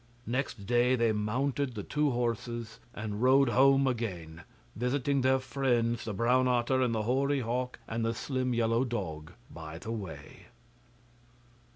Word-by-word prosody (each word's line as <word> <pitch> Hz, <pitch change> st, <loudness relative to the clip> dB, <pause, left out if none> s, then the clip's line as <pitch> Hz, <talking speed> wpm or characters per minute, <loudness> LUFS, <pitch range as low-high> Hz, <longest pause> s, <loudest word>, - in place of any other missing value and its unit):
Next 120 Hz, -4 st, -3 dB
day 120 Hz, +3 st, +3 dB
they 115 Hz, -2 st, +2 dB
mounted 125 Hz, +5 st, -1 dB
the 105 Hz, -, -4 dB
two 150 Hz, +5 st, 0 dB
horses 120 Hz, -1 st, -3 dB
and 105 Hz, -1 st, -5 dB
rode 130 Hz, +1 st, +5 dB
home 135 Hz, +3 st, +5 dB
again, 90 Hz, -10 st, -3 dB, 0.3 s
visiting 135 Hz, +3 st, 0 dB
their 130 Hz, +1 st, +4 dB
friends 120 Hz, -3 st, 0 dB
the 110 Hz, -, -3 dB
brown 125 Hz, +4 st, +3 dB
otter 125 Hz, +1 st, +2 dB
and 120 Hz, -3 st, +1 dB
the 110 Hz, -, 0 dB
hoary 135 Hz, +4 st, +1 dB
hawk 125 Hz, +2 st, -2 dB
and 115 Hz, 0 st, -2 dB
the 115 Hz, 0 st, 0 dB
slim 130 Hz, +1 st, -2 dB
yellow 115 Hz, +1 st, +2 dB
dog 85 Hz, -10 st, -4 dB, 0.2 s
by 80 Hz, -1 st, -8 dB
the 110 Hz, -, -6 dB
way. 100 Hz, -8 st, -8 dB
120 Hz, 150 wpm, -30 LUFS, 110-130 Hz, 0.3 s, rode